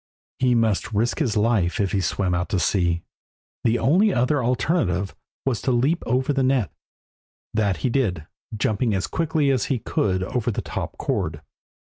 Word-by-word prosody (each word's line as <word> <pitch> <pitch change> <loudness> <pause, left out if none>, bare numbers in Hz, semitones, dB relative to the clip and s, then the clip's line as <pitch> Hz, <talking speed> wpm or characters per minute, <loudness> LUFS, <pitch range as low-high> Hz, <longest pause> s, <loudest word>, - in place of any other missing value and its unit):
He 125 -1 +3
must 110 -2 +1
risk 115 +7 0
his 120 -9 0
life 105 -4 +2
if 100 -2 +1
he 100 - +1
swam 90 +1 0
out 90 +1 -1
to 95 - 0
sea. 85 +1 +1 0.6
The 115 +1 +3
only 190 - +3
other 130 +1 +1
alternative 115 - 0 0.3
was 130 -5 0
to 130 - 0
leap 135 +8 +2
over 130 +4 +1
the 135 - +1
net. 130 -4 +1 0.8
That 100 -4 +1
he 125 - +2
did, 95 - 0 0.3
jumping 110 +1 +1
as 95 - 0
quickly 160 -3 +1
as 130 -6 +1
he 135 - 0
could 95 -4 0
over 120 +4 -1
the 110 - -2
top - - -5
cord. - - -2
115 Hz, 170 wpm, -23 LUFS, 95-130 Hz, 0.8 s, He